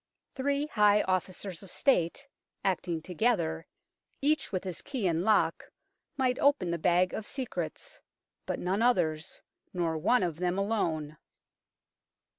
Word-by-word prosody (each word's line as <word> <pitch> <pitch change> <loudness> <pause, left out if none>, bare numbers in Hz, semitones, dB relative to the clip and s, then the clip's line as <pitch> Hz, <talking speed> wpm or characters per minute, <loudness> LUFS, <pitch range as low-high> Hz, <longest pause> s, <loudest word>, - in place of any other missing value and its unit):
Three 280 +2 0
high 210 -6 +4
officers 185 -1 -2
of 195 - -11
State, 265 - +1 0.4
acting 175 -4 -1
together, 170 -4 0 0.5
each 295 0 +1
with 185 -3 -2
his 185 -3 -4
key 260 -8 -4
in 170 -1 +1
lock, 215 +1 +2 0.5
might 255 -1 +1
open 280 - +3
the 170 - -2
Bag 180 +2 +3
of 215 - -5
Secrets, 260 -3 -5 0.5
but - - -1
none 190 +4 -1
others, 160 -10 +1 0.3
nor 165 -3 0
one 245 +8 +3
of 170 -3 -2
them 180 +1 0
alone. 165 -8 -1
190 Hz, 130 wpm, -30 LUFS, 170-245 Hz, 0.5 s, high